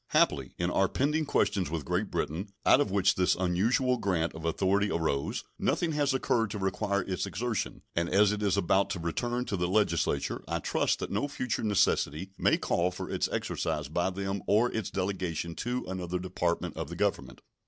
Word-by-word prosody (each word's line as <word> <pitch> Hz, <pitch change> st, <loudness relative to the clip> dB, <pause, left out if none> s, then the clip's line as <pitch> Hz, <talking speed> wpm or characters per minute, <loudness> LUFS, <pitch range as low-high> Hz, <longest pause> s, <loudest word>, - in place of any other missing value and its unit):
Happily, -, -, +2 dB
in 85 Hz, 0 st, 0 dB
our 95 Hz, +1 st, +3 dB
pending 150 Hz, +3 st, +1 dB
questions 95 Hz, -, +1 dB
with 80 Hz, -3 st, -3 dB
Great -, -, -1 dB
Britain, 90 Hz, +8 st, -2 dB, 0.2 s
out 140 Hz, -, +6 dB
of 145 Hz, -, 0 dB
which 100 Hz, 0 st, +3 dB
this 90 Hz, -1 st, +2 dB
unusual 110 Hz, +9 st, +2 dB
grant 85 Hz, -7 st, 0 dB
of 80 Hz, 0 st, -8 dB
authority 100 Hz, +5 st, +2 dB
arose, 80 Hz, -6 st, -1 dB, 0.2 s
nothing 170 Hz, -2 st, +1 dB
has 145 Hz, -2 st, +1 dB
occurred 120 Hz, -4 st, +1 dB
to 105 Hz, -, -4 dB
require 100 Hz, 0 st, 0 dB
its 95 Hz, -2 st, -2 dB
exertion, 115 Hz, +2 st, -3 dB
and 85 Hz, +1 st, 0 dB
as 100 Hz, +1 st, +4 dB
it 105 Hz, 0 st, -2 dB
is 100 Hz, -2 st, +2 dB
about 95 Hz, +1 st, +2 dB
to 90 Hz, -, -3 dB
return 120 Hz, +9 st, -2 dB
to 105 Hz, -, -2 dB
the 90 Hz, -1 st, 0 dB
Legislature 105 Hz, +3 st, +1 dB
I -, -, -1 dB
trust -, -, 0 dB
that -, -, -4 dB
no 105 Hz, +8 st, 0 dB
future 130 Hz, -5 st, -2 dB
necessity 95 Hz, -4 st, +1 dB
may -, -, +3 dB
call 85 Hz, +1 st, +1 dB
for 90 Hz, -, -6 dB
its -, -, 0 dB
exercise 75 Hz, -2 st, -2 dB
by 85 Hz, +4 st, 0 dB
them 95 Hz, +1 st, -3 dB
or 110 Hz, +4 st, +3 dB
its 110 Hz, -4 st, -2 dB
delegation 90 Hz, -4 st, -2 dB
to 125 Hz, +1 st, -2 dB
another 90 Hz, -1 st, -3 dB
Department 90 Hz, -1 st, -2 dB
of -, -, -4 dB
the -, -, -6 dB
Government. -, -, -1 dB
95 Hz, 190 wpm, -29 LUFS, 90-110 Hz, 0.2 s, out